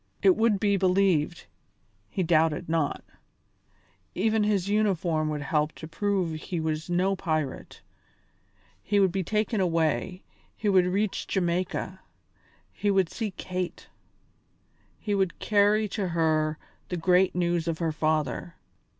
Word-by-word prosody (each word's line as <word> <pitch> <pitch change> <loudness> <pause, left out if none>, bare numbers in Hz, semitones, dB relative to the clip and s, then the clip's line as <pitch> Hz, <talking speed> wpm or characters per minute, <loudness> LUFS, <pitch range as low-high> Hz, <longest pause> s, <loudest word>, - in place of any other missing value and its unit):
It 380 -2 +6
would 220 -5 +2
be 200 -1 +2
believed, 180 -4 +2 0.6
he 190 - -1
doubted 160 0 +2
not; 160 -3 -1 1.1
even 215 +3 +2
his 200 -3 +1
uniform 180 -7 +1
would 150 -1 -3
help 150 +2 0
to 160 - -9
prove 180 -2 -1
he 175 - -4
was 160 +1 -3
no 185 +3 +1
pirate; 155 -7 -3 1.0
he 205 0 +1
would 190 -2 +4
be 190 +1 -1
taken 215 +2 0
away, 165 0 0 0.3
he 215 - -3
would 185 -2 +4
reach 200 +2 -1
Jamaica; 185 +1 -1 0.7
he 205 - -1
would 190 -4 +2
see 220 -2 -3
Kate; 185 -2 -5 1.1
he 210 - -2
would 190 -3 0
carry 210 +1 +3
to 195 -1 -2
her 155 -2 +1 0.3
the 180 - -2
great 180 +2 +3
news 175 -2 0
of 165 -1 -1
her 165 -1 -1
father. 155 +2 -1
180 Hz, 135 wpm, -27 LUFS, 160-200 Hz, 1.1 s, It